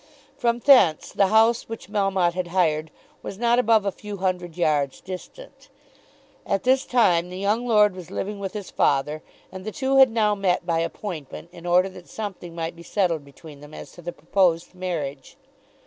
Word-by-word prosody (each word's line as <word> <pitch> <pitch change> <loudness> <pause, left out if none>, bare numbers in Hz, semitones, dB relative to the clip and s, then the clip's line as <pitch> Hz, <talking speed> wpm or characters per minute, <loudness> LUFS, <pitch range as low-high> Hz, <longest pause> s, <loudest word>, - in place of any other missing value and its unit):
From 235 -1 0
thence 240 - +4
the 200 - +3
house 225 +3 +3
which 225 -4 -7
Melmotte 195 -4 +1
had 180 0 -3
hired 160 -3 +1 0.3
was 195 - -7
not 240 +2 +2
above 220 -3 +3
a 200 - +1
few 205 +1 -8
hundred 180 -3 -2
yards 145 -5 0
distant. 185 - -10 0.7
At 195 -1 -1
this 260 +1 +2
time 180 -8 +3
the 180 - -7
young 210 +5 0
lord 210 -4 +4
was 180 -2 -10
living 205 +1 -4
with 195 -1 -5
his 205 -3 -7
father, 150 +2 +1 0.3
and 185 0 -8
the 215 - -5
two 270 0 0
had 265 -1 +8
now 220 -2 +2
met 185 -3 0
by 165 -2 0
appointment 165 -2 -6
in 175 0 -10
order 180 +2 +3
that 185 -2 -14
something 190 -5 -7
might 165 0 -4
be 170 - -13
settled 170 -4 -1
between 140 +1 -14
them 150 +1 -12
as - - -10
to 175 - -14
the 175 +1 -5
proposed 170 +1 0
marriage. 155 -7 -5
185 Hz, 185 wpm, -24 LUFS, 170-210 Hz, 0.7 s, had